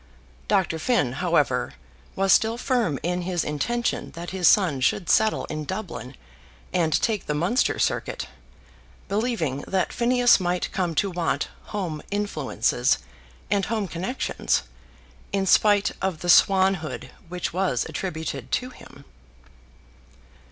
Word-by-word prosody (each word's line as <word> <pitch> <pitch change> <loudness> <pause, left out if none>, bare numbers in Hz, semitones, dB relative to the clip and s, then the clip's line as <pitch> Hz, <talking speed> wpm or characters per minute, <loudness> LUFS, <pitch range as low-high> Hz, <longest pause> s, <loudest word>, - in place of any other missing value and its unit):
Dr. 170 -4 +1
Finn, 235 - +1
however, 145 -6 +1 0.4
was 195 0 +4
still 225 +1 +3
firm 240 - 0
in 180 +1 -1
his 175 -1 -1
intention 235 +12 -1
that 170 +1 -7
his 185 -3 +2
son 170 -10 +4
should 175 +7 +1
settle 220 0 +3
in 155 0 -5
Dublin, 160 - -6 0.6
and 160 -3 +2
take 220 -3 0
the 150 - -1
Munster 180 - +1
Circuit, - - -1 0.8
believing 200 - -1
that 190 -1 0
Phineas 245 0 +4
might 180 -1 -1
come 175 -3 -1
to 195 +6 +1
want 170 -4 -1 0.2
home 175 -7 -4
influences 180 - 0 0.5
and 200 -2 +2
home 220 -3 -1
connections, 185 - -1 0.7
in 195 -1 0
spite 205 +1 +4
of 185 -4 -2
the 175 - -3
swanhood 190 -7 +3 0.2
which 180 -1 -3
was 180 -9 0
attributed 160 - -5
to 255 0 -1
him. 140 - -15
180 Hz, 125 wpm, -24 LUFS, 155-205 Hz, 0.8 s, was